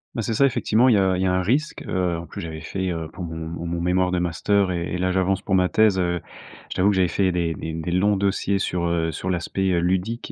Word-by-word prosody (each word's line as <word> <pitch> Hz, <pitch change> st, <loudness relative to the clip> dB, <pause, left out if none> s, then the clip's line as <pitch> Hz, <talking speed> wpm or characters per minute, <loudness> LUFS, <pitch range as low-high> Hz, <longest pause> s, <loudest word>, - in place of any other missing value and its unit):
Bah, 115 Hz, -, -2 dB
c'est 115 Hz, -, -1 dB
ça, 140 Hz, -, +4 dB
effectivement. 120 Hz, -1 st, +2 dB
Il 120 Hz, -, +5 dB
y -, -, +4 dB
a 95 Hz, -1 st, +2 dB
il -, -, -1 dB
y 95 Hz, -, +2 dB
a -, -, +2 dB
un 90 Hz, 0 st, +1 dB
risque. 140 Hz, +11 st, 0 dB
Heu, 90 Hz, -2 st, 0 dB
en 85 Hz, -, -7 dB
plus -, -, -8 dB
j'avais 80 Hz, -2 st, -6 dB
fait, 95 Hz, +3 st, -3 dB
heu, 80 Hz, -1 st, -4 dB
pour 90 Hz, -, -7 dB
mon 80 Hz, -1 st, -6 dB
mon 85 Hz, +1 st, -5 dB
mon 85 Hz, 0 st, -2 dB
mémoire 90 Hz, +1 st, +2 dB
de 90 Hz, -, 0 dB
master 90 Hz, +3 st, +1 dB
et 85 Hz, -1 st, -3 dB
et -, -, -1 dB
là 95 Hz, +1 st, 0 dB
j'avance 95 Hz, +1 st, 0 dB
pour 95 Hz, -, -2 dB
ma 90 Hz, -1 st, +3 dB
thèse, 110 Hz, -3 st, +3 dB
heu, 90 Hz, -1 st, 0 dB, 0.5 s
je -, -, -4 dB
t'avoue 95 Hz, +2 st, +3 dB
que 105 Hz, -, +1 dB
j'avais 95 Hz, -1 st, +3 dB
fait 95 Hz, +2 st, +1 dB
des 85 Hz, -2 st, -1 dB
des 80 Hz, +1 st, -6 dB
des 80 Hz, +2 st, -4 dB
longs 100 Hz, +3 st, +2 dB
dossiers 100 Hz, 0 st, 0 dB
sur, 90 Hz, -2 st, -1 dB
heu, 85 Hz, -1 st, 0 dB
sur 95 Hz, -, -4 dB
l'aspect, 95 Hz, +2 st, -1 dB
heu, 85 Hz, -, +2 dB
ludique 95 Hz, +7 st, -1 dB
90 Hz, 285 wpm, -23 LUFS, 85-95 Hz, 0.5 s, Il